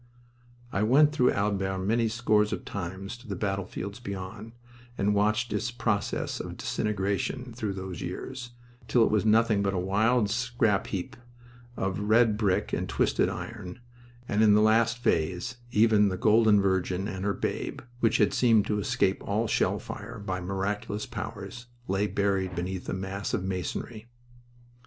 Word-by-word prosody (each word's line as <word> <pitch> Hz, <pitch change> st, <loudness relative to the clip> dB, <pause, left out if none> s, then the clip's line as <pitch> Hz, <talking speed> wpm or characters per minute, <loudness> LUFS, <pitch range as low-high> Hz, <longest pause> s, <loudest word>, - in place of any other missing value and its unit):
I 95 Hz, -, 0 dB
went 140 Hz, +7 st, +5 dB
through 125 Hz, -4 st, +3 dB
Albert 100 Hz, -2 st, 0 dB
many 115 Hz, +2 st, +2 dB
scores 110 Hz, -2 st, +2 dB
of -, -, -4 dB
times 95 Hz, +2 st, -5 dB
to 120 Hz, -, -16 dB
the 100 Hz, -, -3 dB
battlefields 100 Hz, +1 st, -3 dB
beyond, 100 Hz, 0 st, -7 dB, 0.4 s
and 105 Hz, +1 st, +2 dB
watched 105 Hz, +3 st, +1 dB
its -, -, -1 dB
process 110 Hz, -4 st, -1 dB
of -, -, -6 dB
disintegration 105 Hz, +5 st, -2 dB
through 110 Hz, -4 st, -3 dB
those 95 Hz, -3 st, -6 dB
years, 130 Hz, -2 st, -5 dB, 0.3 s
until 120 Hz, -, +3 dB
it -, -, +2 dB
was 105 Hz, -1 st, +2 dB
nothing 110 Hz, -1 st, +4 dB
but 100 Hz, -1 st, 0 dB
a -, -, 0 dB
wild 105 Hz, +5 st, +2 dB
scrap 120 Hz, -4 st, +1 dB
heap 90 Hz, -3 st, -4 dB, 0.6 s
of 95 Hz, 0 st, -1 dB
read 110 Hz, +1 st, +4 dB
brick 105 Hz, -3 st, 0 dB
and -, -, -1 dB
twisted -, -, +2 dB
iron, 110 Hz, -1 st, -7 dB, 0.5 s
and, 105 Hz, -, +1 dB
in 105 Hz, -2 st, +6 dB
the 105 Hz, -, +5 dB
last 115 Hz, +2 st, +3 dB
phase, 110 Hz, -, 0 dB
even 105 Hz, -2 st, +4 dB
the 95 Hz, -, -3 dB
Golden 110 Hz, +1 st, +5 dB
Virgin 95 Hz, 0 st, 0 dB
and 95 Hz, -3 st, -5 dB
her 100 Hz, 0 st, 0 dB
Babe, -, -, -3 dB, 0.2 s
which 115 Hz, -3 st, +3 dB
had 105 Hz, -, +3 dB
seemed 115 Hz, -4 st, +4 dB
to 105 Hz, -1 st, 0 dB
escape 95 Hz, -1 st, +1 dB
all 105 Hz, +3 st, 0 dB
shell -, -, +1 dB
fire -, -, -8 dB
by 95 Hz, -3 st, -4 dB
miraculous 100 Hz, +3 st, -3 dB
powers, 105 Hz, +1 st, -7 dB, 0.2 s
lay 95 Hz, +2 st, +1 dB
buried 95 Hz, -3 st, 0 dB
beneath 90 Hz, +1 st, -4 dB
a -, -, -1 dB
mass 95 Hz, +3 st, -3 dB
of 100 Hz, -, -3 dB
masonry. 95 Hz, +4 st, -4 dB
105 Hz, 160 wpm, -28 LUFS, 95-115 Hz, 0.6 s, in